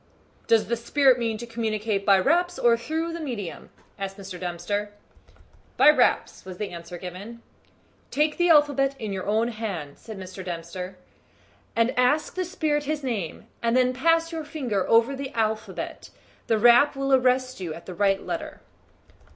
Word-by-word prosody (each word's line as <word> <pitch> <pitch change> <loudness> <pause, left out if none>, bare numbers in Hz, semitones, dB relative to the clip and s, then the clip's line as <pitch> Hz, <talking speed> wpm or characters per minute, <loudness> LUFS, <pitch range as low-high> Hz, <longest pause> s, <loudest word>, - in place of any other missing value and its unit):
"Does 225 -1 +4
the 235 - 0
spirit 255 +2 +3
mean 225 -2 -1
to 240 - -7
communicate 220 -3 -2
by 195 -1 +7
raps 350 - +2
or 235 -1 +4
through 320 +8 -3
the 335 - -5
medium?" 235 - -6 0.3
asked 195 0 -5
Mr. 190 -2 -8
Dempster. 185 +4 -3 0.8
"By 300 - +8
raps," - - +1
was 185 -1 -9
the 205 -1 -4
answer 170 0 -8
given. 195 +7 -9 0.7
"Take 300 +1 +1
the 350 0 +3
alphabet 285 -3 +4
in 215 -5 -4
your 190 0 -4
own 220 +3 +2
hand," 195 -11 -5
said 220 -3 -9
Mr. 185 0 -8
Dempster, 180 +2 -6 0.8
"and 230 +3 +2
ask 290 +5 +2
the 370 0 -2
spirit 310 -5 -1
his 300 0 -2
name, 215 -9 -3 0.2
and 235 +1 +2
then 255 0 +3
pass 330 +5 +2
your 325 -1 -4
finger 255 - -2
over 230 +4 +4
the 270 0 -5
alphabet 220 -1 -3 0.4
the 225 - +3
rap 240 +6 +6
will 275 0 0
arrest 255 -1 +2
you 175 -4 -4
at 170 - -12
the 185 - -7
right 195 +1 +1
letter." 310 -2 -5
230 Hz, 165 wpm, -25 LUFS, 195-280 Hz, 0.8 s, By